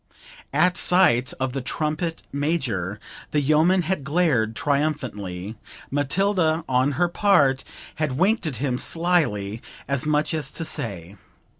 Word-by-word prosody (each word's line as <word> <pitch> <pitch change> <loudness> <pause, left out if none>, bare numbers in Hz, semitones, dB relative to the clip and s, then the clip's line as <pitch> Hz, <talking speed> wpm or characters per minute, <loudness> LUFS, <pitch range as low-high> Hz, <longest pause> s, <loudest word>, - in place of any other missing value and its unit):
At 180 0 +3
sight 130 -10 +3
of 130 -1 -1
the 135 - -2
trumpet 155 +5 -2
major 130 - -1 0.3
the 150 - +1
yeoman 155 +6 +3
had 165 -3 -2
glared 140 -8 +1
triumphantly; 115 -10 -2 0.3
Matilda, 160 +3 +1
on 130 +2 +2
her 175 +4 +2
part, 145 -8 +3 0.3
had 150 -5 -1
winked 195 +1 +2
at 145 - -3
him 125 +1 -1
slily, 135 - 0 0.3
as 140 +1 0
much 150 +2 +1
as 150 -4 -2
to 165 - -3
say 100 - -6
145 Hz, 130 wpm, -24 LUFS, 125-165 Hz, 0.3 s, At